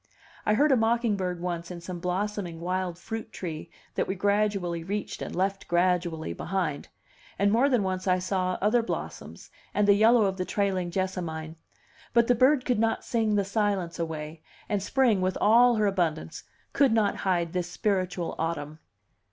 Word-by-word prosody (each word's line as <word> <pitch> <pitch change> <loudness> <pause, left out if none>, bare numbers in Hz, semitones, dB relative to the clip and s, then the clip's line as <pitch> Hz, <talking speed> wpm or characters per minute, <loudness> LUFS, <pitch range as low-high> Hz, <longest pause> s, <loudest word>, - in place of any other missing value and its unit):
I 210 - +4
heard 295 +5 +4
a - - +6
mocking 230 -1 +2
bird 180 -3 -3
once 170 -1 -3
in 180 -1 -7
some 175 +1 -7
blossoming 180 -1 -3
wild 180 0 -2
fruit 225 +4 -6
tree 160 -6 -6 0.2
that - - -1
we 190 - -2
gradually 200 -4 0
reached 205 +4 -4
and - - -5
left 195 +1 -1
gradually 175 - 0
behind; 165 - -3 0.5
and 200 +1 +3
more 245 +6 +4
than 245 -6 +2
once 185 0 -2
I 185 0 +4
saw 185 0 -1
other 225 +4 +4
blossoms, 230 - -6 0.2
and 210 -1 +3
the 200 - +7
yellow 220 +2 +5
of 190 -1 -1
the 185 - -1
trailing 190 -2 -1
jessamine; 170 -4 -3 0.6
but 235 -1 +5
the 245 - +4
bird 255 +3 +3
could 245 -4 +1
not 225 0 0
sing 220 -3 +1
the 200 -1 +1
silence 200 -4 -1
away, 160 -1 -5 0.3
and 205 -2 -1
spring 230 -2 +2
with 185 0 0
all 240 +3 +5
her 215 -1 +2
abundance 170 - -1 0.3
could 275 -5 +4
not 215 -3 +2
hide 175 -3 0
this 180 -1 -2
spiritual 185 -3 -1
autumn. 155 -2 -3
190 Hz, 175 wpm, -27 LUFS, 175-215 Hz, 0.6 s, the